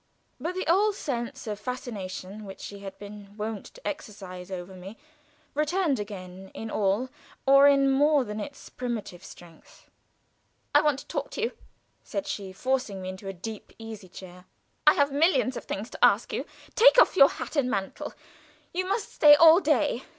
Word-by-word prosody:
But 350 Hz, +3 st, -3 dB
the 375 Hz, -, -2 dB
old 400 Hz, +5 st, +3 dB
sense 260 Hz, -3 st, -4 dB
of 210 Hz, -2 st, -4 dB
fascination 210 Hz, -4 st, -6 dB
which 195 Hz, -1 st, -10 dB
she 200 Hz, -, -8 dB
had 195 Hz, -1 st, -9 dB
been 205 Hz, 0 st, -11 dB
wont 215 Hz, -1 st, -4 dB
to -, -, -10 dB
exercise 195 Hz, -11 st, -7 dB
over 185 Hz, 0 st, -6 dB
me 190 Hz, +4 st, -10 dB, 0.6 s
returned 305 Hz, -, +1 dB
again 190 Hz, -2 st, -8 dB
in 225 Hz, 0 st, -6 dB
all 210 Hz, +5 st, 0 dB, 0.4 s
or 275 Hz, +1 st, +7 dB
in 275 Hz, -1 st, +4 dB
more 290 Hz, +1 st, +4 dB
than 210 Hz, -2 st, -6 dB
its 280 Hz, +6 st, -8 dB
primitive 225 Hz, -7 st, -5 dB
strength. 170 Hz, -2 st, -15 dB, 0.8 s
"I -, -, +7 dB
want 295 Hz, -3 st, +2 dB
to 280 Hz, -, -10 dB
talk -, -, -4 dB
to -, -, -4 dB
you," 460 Hz, -, 0 dB, 0.5 s
said 295 Hz, -, -4 dB
she, 195 Hz, -2 st, -5 dB
forcing 250 Hz, -1 st, -2 dB
me 185 Hz, -, -4 dB
into 190 Hz, +1 st, -8 dB
a -, -, -2 dB, 0.2 s
deep 220 Hz, -2 st, -9 dB
easy 220 Hz, -4 st, -9 dB
chair. 180 Hz, 0 st, -12 dB, 0.4 s
"I 300 Hz, -, +8 dB
have 285 Hz, 0 st, +2 dB
millions 285 Hz, -3 st, +2 dB
of -, -, -6 dB
things 210 Hz, +5 st, -5 dB
to -, -, -5 dB
ask -, -, +4 dB
you. -, -, -2 dB, 0.3 s
Take -, -, +7 dB
off -, -, +5 dB
your 275 Hz, -6 st, +8 dB
hat -, -, -7 dB
and 275 Hz, -4 st, +2 dB
mantle. 195 Hz, -4 st, -4 dB, 0.6 s
You 370 Hz, +1 st, -1 dB
must 400 Hz, +2 st, -2 dB
stay 295 Hz, -1 st, +8 dB
all 325 Hz, +3 st, +8 dB
day. -, -, +1 dB
225 Hz, 180 wpm, -27 LUFS, 195-290 Hz, 0.8 s, I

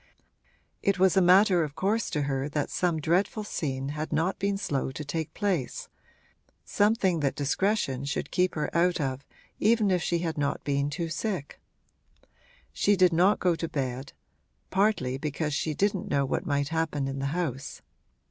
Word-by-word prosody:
It 200 Hz, -1 st, +1 dB
was 190 Hz, 0 st, +4 dB
a 190 Hz, -, +5 dB
matter 185 Hz, 0 st, +5 dB
of 145 Hz, -2 st, -5 dB
course 215 Hz, +4 st, 0 dB
to 150 Hz, -3 st, -1 dB
her 135 Hz, 0 st, -2 dB
that 145 Hz, 0 st, -2 dB
some 175 Hz, -3 st, 0 dB
dreadful 185 Hz, +7 st, +1 dB
scene 135 Hz, -9 st, -3 dB
had 155 Hz, +2 st, -4 dB
not 165 Hz, +5 st, 0 dB
been 200 Hz, 0 st, 0 dB
slow 140 Hz, -9 st, -2 dB
to 150 Hz, +3 st, -6 dB
take 160 Hz, +1 st, -3 dB
place, 190 Hz, -, -2 dB, 0.8 s
something 205 Hz, -5 st, +2 dB
that 140 Hz, -3 st, 0 dB
discretion 140 Hz, -2 st, 0 dB
should 140 Hz, -, -3 dB
keep 180 Hz, 0 st, +1 dB
her 155 Hz, -, -3 dB
out 175 Hz, +1 st, +3 dB
of 135 Hz, -2 st, -2 dB, 0.4 s
even 215 Hz, -2 st, +3 dB
if 180 Hz, -2 st, +2 dB
she 170 Hz, -, 0 dB
had 165 Hz, -3 st, -3 dB
not 140 Hz, -1 st, -1 dB
been 140 Hz, 0 st, 0 dB
too 165 Hz, +3 st, -3 dB
sick. 175 Hz, -3 st, -4 dB, 1.1 s
She 205 Hz, -, +3 dB
did 180 Hz, -2 st, +4 dB
not 185 Hz, +5 st, +4 dB
go 180 Hz, -1 st, +2 dB
to 165 Hz, 0 st, -4 dB
bed 130 Hz, -1 st, -4 dB, 0.6 s
partly 190 Hz, -11 st, +1 dB
because 150 Hz, +1 st, -2 dB
she 155 Hz, +1 st, -1 dB
didn't 200 Hz, +1 st, 0 dB
know 140 Hz, -1 st, +2 dB
what 130 Hz, -, -2 dB
might 145 Hz, -1 st, 0 dB
happen 160 Hz, -4 st, -1 dB
in 135 Hz, 0 st, -4 dB
the 135 Hz, -, -1 dB
house. 140 Hz, -4 st, -3 dB
160 Hz, 170 wpm, -27 LUFS, 140-190 Hz, 1.1 s, a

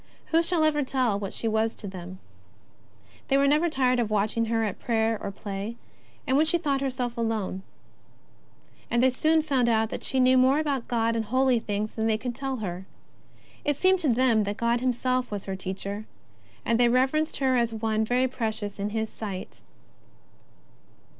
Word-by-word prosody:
Who 325 Hz, +1 st, +5 dB
shall 335 Hz, -1 st, +1 dB
ever 305 Hz, -1 st, +2 dB
tell 255 Hz, -6 st, 0 dB
what 195 Hz, -2 st, -4 dB
she 230 Hz, -, -2 dB
was 220 Hz, +1 st, 0 dB
to 205 Hz, -, -7 dB
them! 185 Hz, -1 st, -8 dB, 1.1 s
They 275 Hz, -, +3 dB
were 280 Hz, -, +4 dB
never 305 Hz, +4 st, +3 dB
tired 255 Hz, -4 st, +2 dB
of 230 Hz, -3 st, 0 dB
watching 215 Hz, +2 st, +1 dB
her 225 Hz, 0 st, 0 dB
at 210 Hz, -3 st, -3 dB
prayer 225 Hz, -1 st, +1 dB
or -, -, -3 dB
play, 200 Hz, +2 st, -5 dB, 0.5 s
and 265 Hz, -2 st, +1 dB
when 310 Hz, +3 st, +4 dB
she 345 Hz, -, +4 dB
thought 285 Hz, -5 st, -1 dB
herself 250 Hz, -3 st, -3 dB
alone; 220 Hz, -5 st, -2 dB, 1.3 s
and 235 Hz, +1 st, +2 dB
they 260 Hz, -, +5 dB
soon 315 Hz, +5 st, +2 dB
found 265 Hz, -6 st, +1 dB
out 220 Hz, -1 st, +1 dB
that -, -, -4 dB
she 265 Hz, -, +1 dB
knew 255 Hz, 0 st, +5 dB
more 260 Hz, +3 st, +4 dB
about 285 Hz, -5 st, -1 dB
God 230 Hz, -1 st, +1 dB
and 225 Hz, -1 st, -1 dB
holy 255 Hz, +2 st, +2 dB
things 210 Hz, 0 st, -3 dB
than 220 Hz, 0 st, -1 dB
they 220 Hz, -1 st, +2 dB
could 245 Hz, +2 st, -4 dB
tell 270 Hz, +1 st, -3 dB
her. 190 Hz, -5 st, -5 dB, 0.8 s
It 290 Hz, -, +1 dB
seemed 375 Hz, +2 st, +3 dB
to 315 Hz, -5 st, 0 dB
them 235 Hz, -2 st, +3 dB
that 205 Hz, +1 st, -3 dB
God 235 Hz, +1 st, +1 dB
Himself 255 Hz, 0 st, 0 dB
was 205 Hz, -2 st, -5 dB
her 195 Hz, -, -3 dB
Teacher, 195 Hz, +3 st, -5 dB, 0.6 s
and 230 Hz, 0 st, +2 dB
they 240 Hz, -1 st, +5 dB
reverenced 265 Hz, +6 st, +1 dB
her 265 Hz, -2 st, +2 dB
as 235 Hz, -2 st, +1 dB
one 220 Hz, 0 st, 0 dB
very 250 Hz, +3 st, +2 dB
precious 220 Hz, -5 st, -3 dB
in 200 Hz, +1 st, -1 dB
His 220 Hz, +1 st, -2 dB
sight. 195 Hz, -4 st, -7 dB
235 Hz, 185 wpm, -26 LUFS, 215-265 Hz, 1.3 s, Who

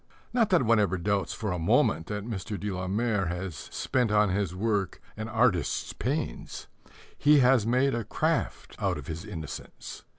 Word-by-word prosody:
Not 235 Hz, -4 st, +3 dB
that 180 Hz, -7 st, +4 dB
one 115 Hz, -1 st, +4 dB
ever 95 Hz, -3 st, +1 dB
doubts 100 Hz, 0 st, 0 dB
for 105 Hz, -4 st, -3 dB
a 90 Hz, -, -2 dB
moment 80 Hz, 0 st, +2 dB
that 105 Hz, -1 st, -4 dB
Mr. 105 Hz, -2 st, -4 dB
de 105 Hz, 0 st, -3 dB
la 95 Hz, 0 st, -3 dB
Mare 105 Hz, -1 st, 0 dB
has 90 Hz, +1 st, -3 dB
spent 120 Hz, -, -1 dB
on 105 Hz, -1 st, +4 dB
his 95 Hz, -2 st, -1 dB
work 100 Hz, -1 st, -1 dB, 0.2 s
an 110 Hz, +1 st, -5 dB
artist's 110 Hz, -7 st, +1 dB
pains. -, -, -3 dB, 0.5 s
He 150 Hz, +1 st, +5 dB
has 125 Hz, -3 st, +4 dB
made 130 Hz, +3 st, +3 dB
a 120 Hz, -1 st, -1 dB
craft -, -, -1 dB
out -, -, 0 dB
of -, -, -8 dB
his 80 Hz, +2 st, -5 dB
innocence. 80 Hz, -8 st, -8 dB
105 Hz, 175 wpm, -28 LUFS, 95-115 Hz, 0.5 s, He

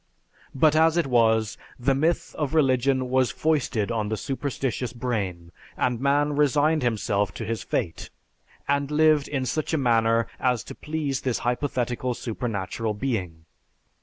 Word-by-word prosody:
But 155 Hz, +3 st, +4 dB
as 160 Hz, +1 st, +4 dB
it 170 Hz, -, +2 dB
was, 110 Hz, -4 st, +2 dB, 0.2 s
the 130 Hz, +2 st, +1 dB
myth 160 Hz, +5 st, 0 dB
of 150 Hz, -1 st, -2 dB
religion 130 Hz, -2 st, +2 dB
was 130 Hz, -2 st, +3 dB
foisted 135 Hz, -9 st, 0 dB
on 110 Hz, -2 st, -1 dB
the 110 Hz, -, -1 dB
superstitious 130 Hz, +2 st, -3 dB
brain, 100 Hz, -9 st, -3 dB, 0.3 s
and 125 Hz, -2 st, 0 dB
man 145 Hz, +2 st, +2 dB
resigned 150 Hz, +2 st, +3 dB
himself 105 Hz, -5 st, 0 dB
to -, -, -5 dB
his 115 Hz, -1 st, -3 dB
fate, 85 Hz, -, -3 dB, 0.6 s
and 140 Hz, 0 st, +1 dB
lived 155 Hz, -1 st, +3 dB
in 135 Hz, -3 st, -2 dB
such 155 Hz, +4 st, -1 dB
a -, -, +1 dB
manner 115 Hz, -3 st, +2 dB
as 125 Hz, -3 st, +1 dB
to -, -, -9 dB
please 150 Hz, -3 st, -3 dB
this 130 Hz, -3 st, -1 dB
hypothetical 125 Hz, -1 st, -1 dB
supernatural 110 Hz, -2 st, -3 dB
being. 95 Hz, -10 st, -3 dB
130 Hz, 145 wpm, -25 LUFS, 115-145 Hz, 0.6 s, But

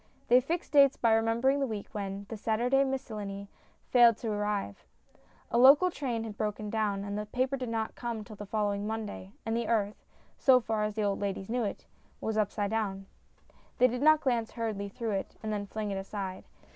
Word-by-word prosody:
They 250 Hz, +1 st, +7 dB
fixed 325 Hz, +6 st, -3 dB
dates 280 Hz, -2 st, +6 dB
by 230 Hz, -2 st, +3 dB
remembering 230 Hz, +5 st, +2 dB
the 275 Hz, -, 0 dB
week 215 Hz, -3 st, -5 dB
when 200 Hz, -1 st, -5 dB
The 225 Hz, -, -4 dB
Sunday 240 Hz, +5 st, +2 dB
Miscellany 210 Hz, -7 st, -4 dB, 0.4 s
failed 240 Hz, -3 st, +7 dB
to 225 Hz, -1 st, -3 dB
arrive; 205 Hz, -, -2 dB, 0.7 s
a 235 Hz, -, +3 dB
local 285 Hz, +8 st, +7 dB
train 245 Hz, -8 st, -3 dB
had 220 Hz, -2 st, -6 dB
broken 210 Hz, -1 st, -2 dB
down, 210 Hz, -3 st, 0 dB
and 200 Hz, 0 st, -4 dB
the 210 Hz, 0 st, -4 dB
paper 255 Hz, +4 st, 0 dB
did 255 Hz, -3 st, -4 dB
not 225 Hz, -1 st, -2 dB
come 235 Hz, -3 st, -4 dB
till 215 Hz, +1 st, -11 dB
the 205 Hz, 0 st, -8 dB
following 205 Hz, -1 st, -1 dB
Monday, 210 Hz, -, -5 dB
and 225 Hz, 0 st, -1 dB
the 235 Hz, -1 st, -1 dB
earth 210 Hz, -3 st, 0 dB, 0.4 s
so 260 Hz, -3 st, +6 dB
far 220 Hz, -2 st, -2 dB
as 210 Hz, -1 st, -4 dB
the 215 Hz, -, 0 dB
old 200 Hz, -1 st, 0 dB
ladies 195 Hz, -1 st, -3 dB
knew 245 Hz, 0 st, 0 dB
it 200 Hz, -, -5 dB, 0.3 s
was 220 Hz, -, -2 dB
up 215 Hz, -2 st, +1 dB
side 205 Hz, -1 st, -2 dB
down. 200 Hz, -3 st, -2 dB, 0.7 s
They 250 Hz, -, +5 dB
did 250 Hz, +1 st, -3 dB
not 310 Hz, +1 st, +6 dB
glance 235 Hz, -4 st, 0 dB
hurriedly 215 Hz, -4 st, -3 dB
through 230 Hz, +1 st, -4 dB
it 195 Hz, -1 st, -3 dB
and 215 Hz, 0 st, -2 dB
then 205 Hz, -1 st, -3 dB
fling 215 Hz, 0 st, -4 dB
it 195 Hz, -, -2 dB
aside. 195 Hz, -1 st, -5 dB
220 Hz, 205 wpm, -30 LUFS, 205-240 Hz, 0.7 s, They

